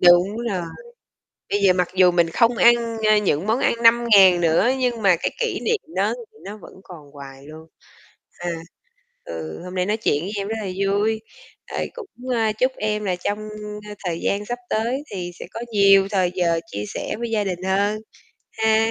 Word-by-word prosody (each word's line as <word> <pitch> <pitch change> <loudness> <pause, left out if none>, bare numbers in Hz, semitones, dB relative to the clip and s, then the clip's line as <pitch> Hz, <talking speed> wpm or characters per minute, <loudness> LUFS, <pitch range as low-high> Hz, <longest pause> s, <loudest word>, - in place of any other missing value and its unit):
Đúng 175 +3 +5
rồi, 185 -3 -2 0.9
bây 205 - +1
giờ 190 - +6
mặc 180 -1 0
dù 185 -1 +6
mình 170 -1 +2
không 235 +5 +2
ăn, 235 -1 +3
ơ, 215 0 +5
những 190 -4 0
món 225 +3 +1
ăn - - +3
5.000 220 -6 +6
nữa 170 +8 +3
nhưng 245 -3 -1
mà 195 -3 +5
cái 170 - -2
kỷ 470 - -1
niệm 460 -2 0 0.2
đó - - +1
thì 445 -2 -14
nó 205 +2 -7
vẫn 215 - -14
còn 155 -5 -13
hoài 135 -1 -11
luôn. 155 +1 -12 0.7
À, 175 - -3 0.7
ừ, 80 -1 -7
hôm 180 +1 -8
nay 180 0 0
nói 210 +2 0
chuyện 150 -8 0
với 195 - -5
em 200 0 -3
rất 220 - -3
là - - -5 0.2
vui, 210 +3 0 0.5
rồi - - -3
cũng, 390 - -10
ơ, 225 -2 +1
chúc 255 +1 +3
em 210 0 -1
là 185 -2 0
trong, 205 +4 -3 0.5
ơ, - - -6
thời 170 -2 -2
gian 205 +1 -1
sắp 245 +2 -4
tới 240 +6 -1
thì 180 -3 -5
sẽ - - -6
có 230 - -6
nhiều 195 -2 +5
thời 185 -3 +1
giờ 170 -2 +1
chia 105 - -4
sẻ - - -4
với 235 0 -3
gia 215 -2 +1
đình 185 -2 -4
hơn 200 +3 0 0.5
ha. 220 0 +2
200 Hz, 200 wpm, -22 LUFS, 180-225 Hz, 0.9 s, giờ